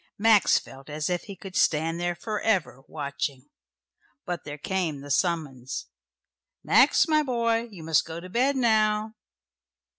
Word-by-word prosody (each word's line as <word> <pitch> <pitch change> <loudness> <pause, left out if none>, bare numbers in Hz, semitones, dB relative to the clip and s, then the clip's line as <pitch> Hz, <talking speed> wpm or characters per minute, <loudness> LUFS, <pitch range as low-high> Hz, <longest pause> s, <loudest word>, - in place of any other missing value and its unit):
Max 215 -2 +5
felt 135 +2 -9
as 150 +3 -2
if 175 -1 -2
he 200 - -8
could 190 0 -10
stand 165 +2 +2
there 175 0 -1
for 210 +4 -4
ever, 185 - 0
watching. 140 -2 -5 0.7
But 175 -3 -4
there 145 0 -6
came 160 -3 -2
the 145 0 -7
summons. 145 -7 -1 0.8
"Max, - - +5
my 310 -1 +3
boy. 235 -4 0
You 185 -7 -11
must 160 -2 +3
go 165 0 -7
to 180 - -9
bed 255 +8 +1
now." 215 -3 +2
175 Hz, 150 wpm, -26 LUFS, 150-215 Hz, 0.8 s, Max